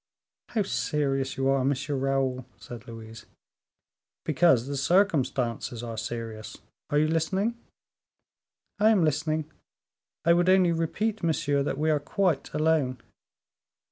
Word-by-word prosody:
"How 220 -3 0
serious 135 -7 -1
you 135 0 0
are, 135 -1 +2
M. 135 +2 +2
Raoul!" 135 -2 -1
said 120 -3 -10
Louise. 115 -1 -10 1.0
"Because 145 -5 +3
the 140 +1 -4
circumstances 135 - +1
are 115 -1 -5
serious. 110 -1 -6 0.3
Are 145 - +1
you 155 +1 +3
listening?" 190 +8 0 1.2
"I 215 +1 +5
am 200 -7 +4
listening; 155 +1 -1 0.7
I 170 - +6
would 175 +1 +3
only 185 -2 +5
repeat, 200 +7 -1
monsieur, 155 -4 +1
that 140 - -2
we 155 +2 +1
are 150 - +2
quite 165 +1 -1
alone." 155 -5 +1
145 Hz, 125 wpm, -27 LUFS, 130-170 Hz, 1.2 s, I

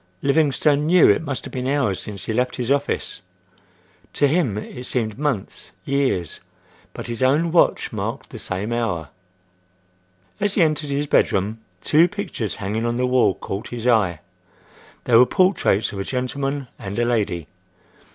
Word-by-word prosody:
Livingstone 145 0 +2
knew 180 0 +6
it 100 - +4
must 140 -5 -4
have - - -8
been 130 0 -3
hours 135 -9 +1
since 100 -2 -7
he 110 - -2
left 125 +2 0
his 125 +1 -2
office. 140 0 -1 0.9
To 145 - +3
him 140 - +1
it 125 +3 -7
seemed 115 -2 -2
months, 130 -10 -3
years;—but 135 - -4
his 120 +1 -5
own 150 +6 +3
watch 170 - +2
marked - - -4
the - - -8
same 100 +5 -3
hour. 90 - -2 1.3
As 205 -1 0
he 180 - +5
entered 155 -2 0
his 140 +1 -1
bedroom, 110 -5 +1 0.2
two 160 +3 +5
pictures 185 - -4
hanging 105 +3 -3
on 120 0 -1
the 125 - +1
wall 125 -6 +3
caught 100 +2 -6
his 120 -1 -6
eye. 100 - +2 0.8
They 120 - +2
were 125 +2 +7
portraits 180 - +2
of 100 - -5
a - - -1
gentleman 135 +3 -3
and 100 +1 -6
a 120 - +2
lady. 105 -9 -1
125 Hz, 160 wpm, -22 LUFS, 105-145 Hz, 1.3 s, were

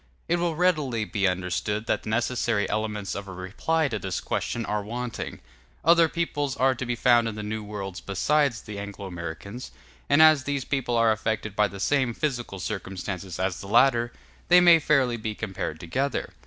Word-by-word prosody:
It 175 - +2
will 170 -2 0
readily 150 -10 +1
be 100 -2 0
understood 95 +4 -1
that - - 0
the - - -7
necessary 115 -1 0
elements 105 -2 -2
of 100 0 -6
a - - -7
reply 100 - -1
to 110 - -3
this 95 -1 -3
question 115 -1 -2
are 105 0 -1
wanting: 120 +2 -5 0.4
other 165 0 +6
peoples 145 -5 -2
are 130 +1 +3
to 130 0 -5
be 120 - 0
found 120 -1 +4
in 110 - -4
the 105 - -5
New 110 +1 -4
World 100 -3 -6
besides 130 +4 +1
the 105 -1 -7
Anglo 100 0 -7
Americans, 90 +6 -7 0.4
and 145 - +5
as 155 -4 +7
these 140 -2 -2
people 130 -4 -1
are 115 -1 +4
affected 110 -1 -2
by 105 0 +3
the 100 0 -9
same 130 +1 +1
physical 120 -9 -2
circumstances 95 0 -5
as 95 -1 -2
the 100 - -8
latter, 120 +1 +4 0.4
they 180 0 +7
may 175 -2 +7
fairly 135 -6 +2
be 110 -1 -4
compared 95 -7 -4
together. 130 +12 -2
115 Hz, 185 wpm, -26 LUFS, 100-135 Hz, 0.4 s, as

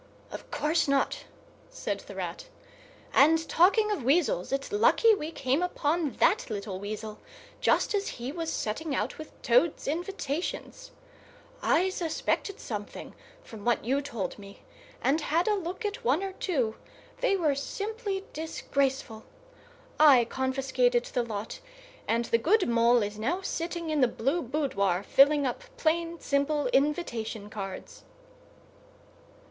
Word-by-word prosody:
"Of - - -9
course 310 +2 +1
not," 275 -1 0 0.4
said - - -4
the - - -11
Rat. - - -5 0.7
"And, 320 +3 +5
talking 400 +8 +4
of 410 - -1
weasels, 270 - +2
it's 275 +5 -2
lucky 440 +2 +5
we 315 -7 -3
came 270 +1 0
upon 320 -4 0
that - - +2
little 200 -3 -4
weasel, 215 +1 -6 0.4
just - - +2
as 405 -1 0
he 245 +2 -4
was 325 0 -3
setting 275 +7 -2
out 220 +6 -2
with 310 - -10
Toad's 250 +7 +2
invitations. 350 - -4 0.7
I 365 +4 +3
suspected 375 +3 -2
something - - -6 0.3
from 220 - -11
what 240 -2 +1
you 270 +4 +1
told 230 -10 -5
me, 200 0 -13 0.4
and 295 +4 +2
had 330 +5 +1
a 430 - +4
look 375 +2 -4
at 410 -1 -3
one 280 +10 +2
or 385 -1 -4
two; 260 - -1 0.4
they 450 -6 +2
were 310 -6 +2
simply 400 - -4
disgraceful. 275 -7 -2 0.8
I 275 -6 +7
confiscated 270 - +1
the 245 - -1
lot, 220 -2 -5 0.5
and 235 +1 +1
the 230 - +2
good 380 - +3
Mole 235 0 +4
is 205 +1 -5
now 325 - -1
sitting 335 -2 -3
in 300 -2 +1
the 250 - +6
blue 275 +9 -1
boudoir, 230 - 0
filling 285 +5 +5
up 270 - -3
plain, 335 -2 0
simple 285 +1 0
invitation 240 - -1
cards." 195 -2 -7
290 Hz, 140 wpm, -28 LUFS, 235-345 Hz, 0.8 s, I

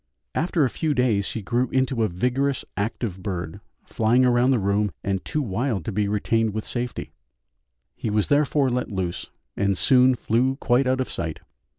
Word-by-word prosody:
After 165 -1 +1
a 130 - +2
few 155 -3 -1
days 115 -6 +1
he 110 - -5
grew 120 +4 0
into 130 -2 0
a 110 - +3
vigorous, 125 +9 -1
active 100 -2 -3
bird, 85 -4 -5 0.2
flying 115 +3 +2
round 125 +1 +4
the 130 - +3
room, 100 0 +1
and 95 -1 -1
too 150 - -2
wild 110 - -2
to - - -2
be 105 0 0
retained 110 +1 0
with 110 - -3
safety 120 - -4 0.8
He - - -3
was 105 -1 +1
therefore 145 -2 +2
let 125 +1 -1
loose, 90 -3 -3 0.3
and 100 -1 +1
soon 130 +3 +5
flew 125 +3 +1
quite 130 -1 +2
out 130 0 +1
of 130 - -3
sight. 80 -2 -4
120 Hz, 180 wpm, -24 LUFS, 100-130 Hz, 0.8 s, soon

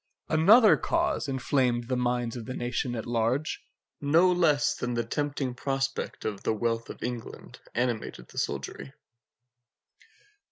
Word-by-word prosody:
Another 205 +8 +7
cause 335 - 0
inflamed 130 -3 0
the 130 - 0
minds 120 -1 -1
of 120 -1 -7
the 130 - -4
nation 120 0 -2
at 110 - -4
large, 120 +6 0 0.4
no 165 +6 +4
less 155 -5 +3
than 125 -1 -3
the 120 - 0
tempting 140 +1 -2
prospect 135 +1 -3
of 105 -3 -3
the 110 - 0
wealth 115 +1 -1
of - - -8
England 120 -2 -6 0.2
animated 120 - -2
the - - -5
soldiery. 70 -1 -4
125 Hz, 135 wpm, -28 LUFS, 120-145 Hz, 0.4 s, Another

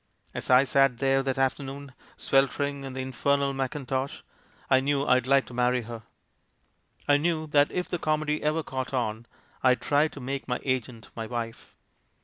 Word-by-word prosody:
As - - -5
I 130 +1 +7
sat 135 -2 +3
there 135 +1 +2
that 135 -1 -2
afternoon, 135 +1 -2 0.2
sweltering 140 +1 +1
in 135 - -6
the 130 - -4
infer 130 +2 +1
nal 140 -1 -1
mackintosh, 135 0 -3 0.4
I 130 - +5
knew 140 +1 0
I'd 125 -1 +3
like 135 0 +4
to - - -12
marry 125 0 +1
her; 115 0 -8 1.1
I 145 0 +5
knew 160 +1 0
that 145 -1 +3
if 180 - -2
the 175 - -3
comedy 155 -1 0
ever 155 +2 0
caught 130 -1 -4
on, 115 -1 -2 0.3
I'd 130 -1 +4
try 145 +2 +2
to 145 - -11
make 135 +1 -4
my 125 -1 -1
agent 125 -3 -3
my 115 -1 -4
wife. 115 -1 -6
135 Hz, 175 wpm, -27 LUFS, 125-140 Hz, 1.1 s, I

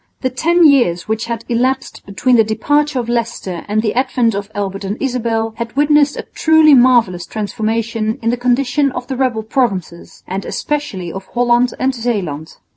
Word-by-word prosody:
The 260 - -1
ten 335 +6 +3
years 235 - +3
which 220 +1 -2
had 230 -1 -5
elapsed 255 +2 -1
between 245 +6 +1
the 225 - +5
departure 290 +6 0
of 240 -2 -2
Leicester 230 -7 -3
and 215 +1 0
the 215 - 0
advent 250 -2 +1
of 200 +1 -4
Albert 195 -1 -3
and 200 +3 -3
Isabel 230 -4 -1
had 235 0 -5
witnessed 295 0 +3
a - - -4
truly 315 -1 +5
marvellous 240 -9 +4
transformation 220 +1 -2
in 230 - +2
the - - 0
condition 250 +3 +1
of 245 - -5
the 265 - -4
rebel 250 -4 -1
provinces, 200 - -3
and 190 +2 -4
especially 200 -13 -3
of 190 0 -8
Holland 245 0 +2
and 265 +1 +1
Zeeland. 195 - -4
235 Hz, 175 wpm, -16 LUFS, 210-260 Hz, -, the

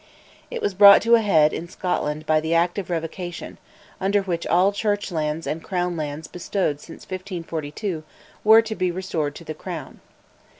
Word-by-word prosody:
It 480 -2 -5
was 205 - 0
brought 200 +1 +8
to 230 +2 +3
a 230 - +7
head 160 -8 +4
in 170 +1 -5
Scotland 155 -5 -2
by 155 0 +3
the 160 +2 -1
"Act 175 +3 +2
of 190 - -6
Revocation," 175 +1 -5 0.4
under 195 +1 +1
which 170 -3 -3
all 185 +3 +4
Church 205 -1 -1
lands 155 -1 -2
and 160 +1 -3
Crown 180 -1 -1
lands 150 0 -4
bestowed 180 -4 -2
since 165 - -12
1542 170 -2 -5 0.4
were 220 +1 +7
to 225 -1 -4
be 185 -3 0
restored 170 -5 -3
to - - -10
the 155 - -6
Crown. 160 -2 -8
175 Hz, 175 wpm, -23 LUFS, 160-195 Hz, 0.4 s, brought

